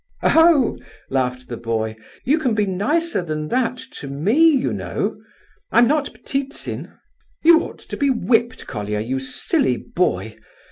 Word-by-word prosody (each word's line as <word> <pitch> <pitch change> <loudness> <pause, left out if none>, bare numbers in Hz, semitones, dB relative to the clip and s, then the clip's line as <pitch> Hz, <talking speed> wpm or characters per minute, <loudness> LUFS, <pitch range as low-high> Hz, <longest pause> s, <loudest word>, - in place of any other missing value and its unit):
"Oho!" 325 -6 +5 0.3
laughed 125 -1 -1
the 120 - -5
boy, 110 -1 -2 0.3
"you 300 +5 +2
can 255 -7 0
be 210 -1 +2
nicer 285 - 0
than 155 -2 -4
that 250 0 0
to 145 - -8
me, 145 +10 -1 0.2
you 275 -4 +1
know—I'm 240 - -2
not 295 +1 +1
Ptitsin!" 275 +1 -4 0.5
"You 330 0 +7
ought - - -7
to - - -8
be 280 - +2
whipped, 240 -1 +1
Colia, 105 -2 -3
you 130 +4 -2
silly 275 - 0
boy. - - -2
230 Hz, 140 wpm, -21 LUFS, -, 0.5 s, You